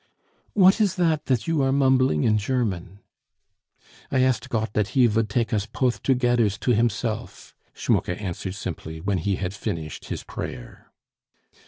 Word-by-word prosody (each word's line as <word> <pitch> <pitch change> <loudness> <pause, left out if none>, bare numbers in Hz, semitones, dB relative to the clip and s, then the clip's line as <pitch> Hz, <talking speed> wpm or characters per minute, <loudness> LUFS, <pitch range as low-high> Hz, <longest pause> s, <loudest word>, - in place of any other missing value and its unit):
"What 195 +2 +5
is 200 -4 +2
that 160 -4 +1
that 125 -4 +1
you 165 -3 +1
are 135 0 +2
mumbling 130 - +3
in 110 -1 +3
German?" 100 -5 -2 1.1
"I 130 - +2
asked 130 0 +1
Gott 110 -3 -2
dat 105 -2 +1
He 125 - +7
vould 110 -1 +1
take 115 +2 0
us 105 -1 0
poth 125 -2 -1
togedders 120 -5 +2
to 125 - +1
Himself!" 115 0 -2 0.2
Schmucke 90 - 0
answered 95 -1 -4
simply 80 -5 -6
when 95 +2 -1
he 100 +4 0
had 90 0 -3
finished 80 -6 -5
his - - -5
prayer. - - -8
115 Hz, 155 wpm, -24 LUFS, 100-130 Hz, 1.1 s, He